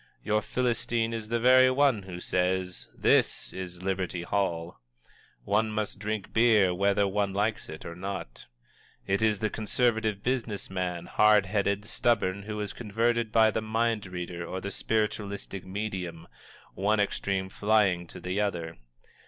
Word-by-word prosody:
Your 105 0 +1
Philistine 120 -1 0
is 110 -2 -4
the 120 +1 0
very 130 +2 +6
one 130 -4 +3
who 95 -2 -8
says: 90 0 -1
"This - - +2
is 90 -1 -7
Liberty 95 -2 -2
Hall!" 85 -3 -2 0.6
and - - -36
one 110 +2 +2
must 105 -2 -3
drink 105 -1 -4
beer 110 -5 +5
whether 100 +2 +2
one 100 0 0
likes 110 +3 -1
it 80 - -8
or 85 - -6
not. 95 -9 -6 0.6
It 95 +1 0
is 110 -1 +3
the 110 +1 -1
conservative 110 -2 0
business 120 -7 -2
man, 90 -2 -3
hard 105 -2 +4
headed, 100 +1 0
stubborn, 105 -4 +1
who 105 +1 -5
is 105 -1 -4
converted 115 +1 0
by 110 -1 +5
the 110 - -1
mind 110 -1 0
reader 90 -1 -5
or 95 +2 -4
the 100 +1 -5
spiritualistic 100 -3 -2
medium 95 -5 -4 0.5
one 105 +2 +1
extreme 100 -1 0
flying 100 -3 +2
to - - -9
the 95 +3 -2
other. 85 -7 -2
100 Hz, 155 wpm, -28 LUFS, 95-110 Hz, 0.6 s, very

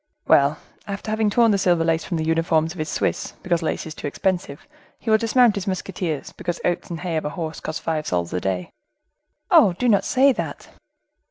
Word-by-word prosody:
"Well, 140 +2 +4 0.3
after 200 +1 -5
having 220 -1 +1
torn 230 +2 +4
the 200 - +2
silver 175 -3 +3
lace 165 0 +1
from 175 - -3
the 160 - -1
uniforms 165 0 +1
of 180 - -11
his 155 - -2
Swiss, - - -2
because 175 -2 +1
lace 160 - -2
is 160 - -6
too - - -6
expensive, 175 -2 -2 0.3
he 225 - -3
will 220 - +5
dismount 230 0 +4
his 200 -1 -4
musketeers, 185 -5 -3
because 175 -1 -4
oats 175 - -1
and 170 -1 -5
hay 175 -3 -2
of 155 - -3
a - - -1
horse 160 +1 -5
cost 155 - -5
five 155 -2 -2
sols 85 -1 -1
a 90 - -1
day." 90 -2 -2 0.8
"Oh! 185 - +6
do 245 +8 -1
not 205 -4 +4
say 270 +2 +4
that." - - -5
175 Hz, 210 wpm, -22 LUFS, 155-200 Hz, 0.8 s, Oh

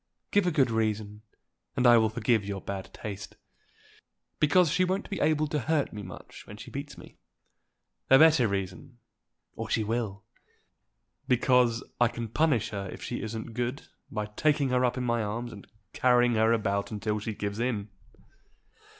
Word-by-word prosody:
Give 205 -3 +3
a - - +3
good 135 -6 +2
reason, 110 -2 -1 0.6
and 125 - +2
I 120 -1 +8
will 110 -1 +2
forgive 110 -1 +1
your 100 0 -4
bad 95 0 -6
taste." 100 -2 -7 1.0
"Because 155 +2 +4
she 180 +3 +2
won't 190 +3 -2
be 195 - -2
able 155 0 +2
to 150 - 0
hurt 155 +1 0
me 105 - -6
much 90 -2 -11
when 105 - -10
she - - -10
beats 140 +1 -6
me." - - -14 0.9
"A 135 - +8
better 155 -5 +6
reason, 100 +4 -4 0.6
or - - -5
she 110 - +1
will." 105 -2 -3 1.0
"Because 125 -1 +3 0.2
I 120 - +5
can 115 0 -5
punish 135 -3 +1
her 100 -2 -5
if - - -9
she - - -4
isn't 110 +2 -5
good 125 +4 -3 0.3
by 105 -2 -3
taking 140 +6 +1
her 125 0 +2
up 125 0 +1
in 125 - -1
my 120 -1 +1
arms, 115 +3 -4
and 100 - -12 0.3
carrying 125 -1 +4
her 110 0 +3
about 100 -3 0
until 105 0 -2
she 110 +1 -4
gives 100 +1 -4
in." 110 -4 -1
115 Hz, 170 wpm, -28 LUFS, 105-135 Hz, 1.0 s, I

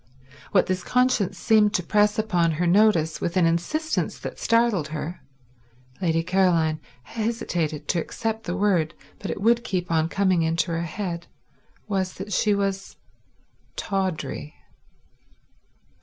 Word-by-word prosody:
What 190 - +4
this 185 -1 -2
conscience 240 -7 +1
seemed 210 +1 +3
to 180 - +1
press 210 +3 +2
upon 180 -7 +1
her 170 +4 -1
notice 175 -4 +3
with 175 +2 -1
an 180 - +4
insistence 175 - -1
that - - -7
startled 230 -9 +2
her—Lady 135 0 -5
Caroline 170 -4 +2 0.2
hesitated 175 - -3
to 175 - +2
accept 225 +3 -4
the 175 +2 -2
word, 185 -6 +1 0.2
but - - -5
it - - -3
would 235 +3 +3
keep 180 -6 -2
on 160 0 +2
coming 190 -3 +2
into 165 +2 0
her 165 0 -1
head—was 185 +2 -5
that 195 +2 -6
she 210 +2 +2
was 195 -1 -2 0.8
tawdry. 185 -6 -3
185 Hz, 125 wpm, -24 LUFS, 165-210 Hz, 0.8 s, What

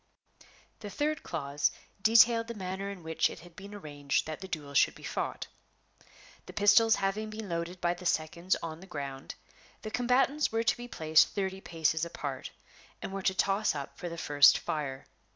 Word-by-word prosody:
The 205 - -7
third 295 +5 -1
clause 145 -3 -1 0.3
detailed 230 +1 +5
the 235 - -6
manner 190 0 -4
in 195 -4 -8
which 160 0 +1
it - - -10
had 175 0 -15
been 200 +2 -10
arranged 145 -7 -2
that 155 +2 -6
the 190 - -6
duel 150 -6 -6
should - - +4
be - - -14
fought. - - -3 1.0
The - - -9
pistols 215 +2 +5
having 200 +2 -1
been 215 0 -6
loaded 170 +1 -4
by 175 0 +1
the 175 0 -5
seconds 170 +3 0
on 160 -1 -5
the 190 - -13
ground, 140 -4 -6 0.5
the 215 - -5
combatants 260 +5 +2
were 225 0 0
to - - +2
be 240 0 -8
placed 160 -8 +4
thirty 190 -1 -3
paces 160 -2 0
apart, 145 -5 -5 0.5
and - - -6
were 195 - -3
to 190 0 +1
toss 195 -1 +1
up 140 -1 -6
for 175 - -6
the 170 - -7
first 145 -4 +6
fire. 135 -4 -4
185 Hz, 185 wpm, -30 LUFS, 155-210 Hz, 1.0 s, first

